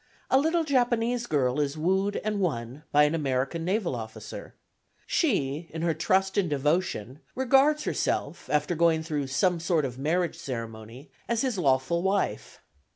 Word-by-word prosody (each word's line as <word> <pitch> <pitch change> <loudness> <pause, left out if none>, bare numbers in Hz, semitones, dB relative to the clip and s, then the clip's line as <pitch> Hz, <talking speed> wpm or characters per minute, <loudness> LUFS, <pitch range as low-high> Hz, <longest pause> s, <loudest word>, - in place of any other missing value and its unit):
A 265 - +6
little 325 +3 +2
Japanese 245 -4 +1
girl 135 -2 +1
is 145 +1 -1
wooed 190 +5 +1
and 210 -1 -1
won 135 -7 -2
by 150 0 +6
an 150 +1 +2
American 140 +1 -1
naval 185 - 0
officer. 110 -2 -8 0.5
She, 165 - 0
in 160 +1 -5
her 170 -1 +2
trust 190 +4 +1
and 180 -4 0
devotion 145 - -1 0.2
regards 270 +4 +3
herself, - - -2
after 150 +3 +1
going 165 -1 +2
through 150 -4 -2
some 170 +6 +1
sort 165 -2 +1
of 125 -1 -6
marriage 165 +3 0
ceremony, 115 -2 -7 0.2
as 235 -1 0
his 255 -7 -1
lawful 140 +3 +2
wife. 195 +2 -1
165 Hz, 155 wpm, -27 LUFS, 135-200 Hz, 0.5 s, A